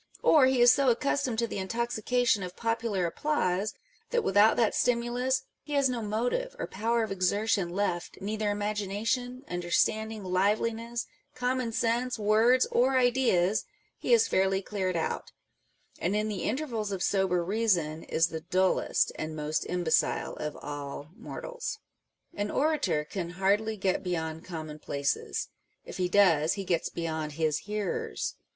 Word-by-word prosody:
Or 290 -5 +6
he 260 -2 +2
is 240 0 +8
so 275 -2 +3
accustomed 260 0 0
to 235 - +2
the 200 - -4
intoxication 235 +2 0
of 180 -1 -6
popular 225 -5 -1
applause, 195 - 0 0.3
that 480 -1 +1
without 205 +3 +5
that 230 -3 +3
stimulus 245 +2 +1 0.2
he 295 - -7
has 280 -2 +3
no 245 -2 -2
motive 245 - -1
or - - -3
power 230 +3 0
of 220 - -4
exertion 195 0 +1
left 180 -1 -2
â€" - - -18
neither 210 +1 -1
imagination, 210 +5 -2
understanding, 215 +5 0
liveliness, 220 +5 0 0.3
common 250 -1 -1
sense, 240 +2 0
words, 220 +4 +4
or 260 +2 +3
ideas 240 -7 +3
â€" - - -21 0.3
he - - -2
is 455 -1 +6
fairly 190 - +2
cleared 190 -2 -2
out; 160 - -3 0.7
and 185 +4 0
in 215 +1 0
the 200 -4 -3
intervals 230 -5 -2
of 190 -2 -2
sober 190 -3 +1
reason, 180 -7 +1
is 165 +1 +1
the 160 -1 -5
dullest 185 +2 +1
and 155 0 -4
most 150 0 -2
imbecile 175 -2 +1
of 150 -1 -4
all 145 0 -6
mortals. 480 - -6 0.6
An 205 0 -2
orator 270 - +1
can 170 +1 -4
hardly 210 +3 +1
get 190 -1 0
beyond 160 -3 -3
commonplaces: 150 -4 -3 0.4
if - - -8
he 180 -1 0
does, 170 -5 +4
he 195 -2 -5
gets 175 -3 0
beyond 160 -2 -3
his 155 -1 0
hearers. 210 - -2
210 Hz, 150 wpm, -29 LUFS, 180-240 Hz, 0.7 s, is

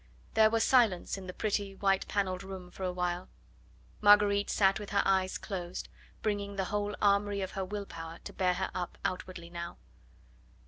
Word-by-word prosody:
There 220 -1 +6
was 225 0 +2
silence 230 -9 +3
in 190 -1 -8
the - - -4
pretty 200 -2 -1
white 195 -1 +1
panelled 190 -2 -1
room 190 -2 -8
for - - -12
a 185 -1 0
while. 180 0 -2 0.7
Marguerite 205 0 +6
sat 195 -1 +3
with 205 - -7
her 200 -1 +2
eyes 190 -1 +2
closed, 180 -3 -5 0.3
bringing 205 -1 -1
the 190 -1 -1
whole 205 0 0
armoury 200 0 +3
of 190 - -3
her 195 - -3
will 200 +2 -4
power 165 -2 -8
to - - -8
bear 180 -1 +2
her 190 +1 -2
up 180 -1 -4
outwardly 180 -2 -4
now. 170 - -6
195 Hz, 180 wpm, -31 LUFS, 185-205 Hz, 0.7 s, There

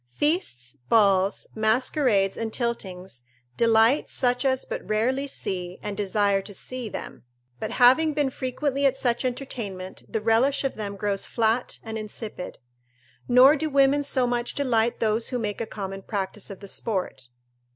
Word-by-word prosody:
Feasts, 125 - -1
balls, 200 -3 +3
masquerades 220 -2 +2
and 225 -1 -3
tiltings 190 - -4 0.3
delight 230 +4 +4
such 250 0 +1
as 260 -1 +1
but - - -5
rarely 255 +6 +1
see, 180 -8 -3
and 205 -1 -4
desire 200 -1 +1
to 205 0 -9
see, 255 +2 -5
them; - - -7 0.4
but 215 - -3
having 280 +5 +5
been 290 -3 +1
frequently 275 +2 0
at 265 0 0
such 240 -2 0
entertainments, 230 -8 -5
the 220 - -1
relish 230 +7 +2
of 270 - -1
them 200 -2 -5
grows 200 0 -1
flat 230 +1 0
and 220 -1 -5
insipid. 215 -3 -7 0.7
Nor 255 +4 +7
do 315 +1 -2
women 275 0 +4
so 265 -3 0
much 240 0 -2
delight 235 -4 +1
those 220 +1 +1
who 250 - -2
make 210 -3 -3
a 225 - -3
common 195 -2 -6
practice 195 0 -4
of 195 -1 -9
the 200 - -9
sport. 190 - -4
225 Hz, 155 wpm, -25 LUFS, 200-260 Hz, 0.7 s, Nor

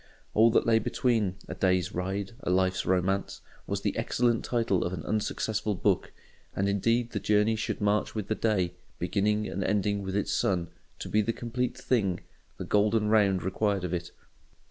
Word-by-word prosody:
All 110 +2 +6
that 115 - +3
lay 115 -1 +4
between! 115 -7 0
"A - - -5
Day's 95 0 +1
Ride 95 +2 -3
a - - -3
Life's 95 0 +1
Romance" 95 +1 0 0.3
was - - -2
the - - -1
excellent 120 -2 +1
title 115 -6 +1
of 90 - -3
an 80 -4 -5
unsuccessful 110 0 -1
book; - - +1 0.4
and 95 - +1
indeed 115 +4 +1
the 105 - -2
journey 105 +2 +2
should 110 - -3
march 105 +2 +1
with 105 -3 -3
the - - +1
day, 100 -6 0 0.2
beginning 105 +1 0
and 95 +3 -3
ending 100 +1 0
with 95 -1 -4
its 100 - 0
sun, 85 -3 0 0.3
to - - -6
be 110 - +2
the 115 +2 -1
complete 125 +2 -3
thing, 100 -8 0 0.4
the - - -5
golden 105 +1 +2
round, 100 -4 +3
required 100 +1 0
of 90 -1 -3
it. 85 -1 -3
100 Hz, 180 wpm, -28 LUFS, 95-110 Hz, 0.4 s, All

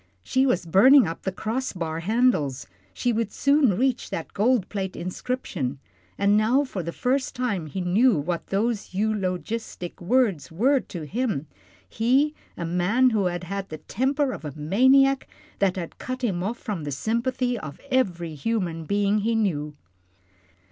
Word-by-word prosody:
She 260 - +2
was 180 -9 +1
burning 225 - +6
up 165 - -5
to - - -29
the 190 - 0
cross 230 +7 -3
bar 165 -3 -3
handles, 175 - +1 0.3
she 240 - -1
would 225 -2 -1
soon 280 -8 +3
reach 255 +1 0
that 165 - -5
gold 220 -1 +2
plate 190 -2 -4
inscription, 180 - -3 0.4
and 200 +1 +3
now 230 +7 +3
for 210 -9 -4
the 170 0 -4
first 260 +7 -1
time 205 -10 -2
he 185 +5 -4
knew 200 +5 +3
what 165 +3 -3
those 210 -1 -1
eulogistic 195 -2 -3
words 190 - +1
were 260 - +3
to 175 -9 -7
him 205 - -2 0.4
he, 265 +7 +2 0.2
a 170 - -3
man 190 +10 +2
who 210 -4 +1
had 175 0 -2
had 195 +2 -5
the 155 - -6
temper 270 - 0
of - - -7
a 150 -3 -5
maniac 260 - +4 0.3
that 195 -2 +2
had 175 -3 -6
cut 255 0 -5
him 190 -7 0
off 220 +6 -2
from 200 -9 -4
the 145 - -4
sympathy 245 - -1
of 145 -5 -8
every 175 -11 0
human 170 -1 -2
being 200 +3 +1
he 225 +2 0
knew. 150 -9 -1
205 Hz, 165 wpm, -25 LUFS, 175-250 Hz, 0.4 s, burning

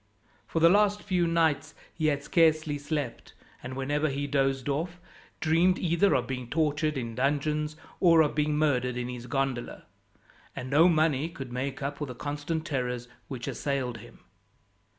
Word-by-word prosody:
For 165 - -1
the 165 - +7
last 205 +2 +3
few 180 -4 +1
nights 165 -3 +1 0.2
he 155 -2 0
had 145 -2 0
scarcely 155 -3 +2
slept, 145 -4 -4 0.3
and 130 +1 -6
whenever 145 +3 0
he 140 +1 -2
dozed 135 -2 0
off, 165 +5 -2 0.4
dreamed 170 +3 +3
either 175 +3 +2
of 125 - +1
being 125 -2 -5
tortured 155 0 0
in 115 -3 -4
dungeons, 150 +4 0 0.2
or 165 -3 +6
of 150 - +2
being 150 0 +1
murdered 125 -5 +1
in 125 0 -3
his 125 -1 -7
gondola; 135 -3 -2 0.7
and 130 +1 -6
no 160 +5 +6
money 155 -2 +2
could 135 -6 -8
make 135 +2 -3
up 140 +1 -3
for 150 - -3
the 125 - -7
constant 145 +4 -3
terrors 125 -3 -3 0.2
which 125 -3 -6
assailed 130 -5 -2
him. - - -15
145 Hz, 165 wpm, -28 LUFS, 130-160 Hz, 0.7 s, the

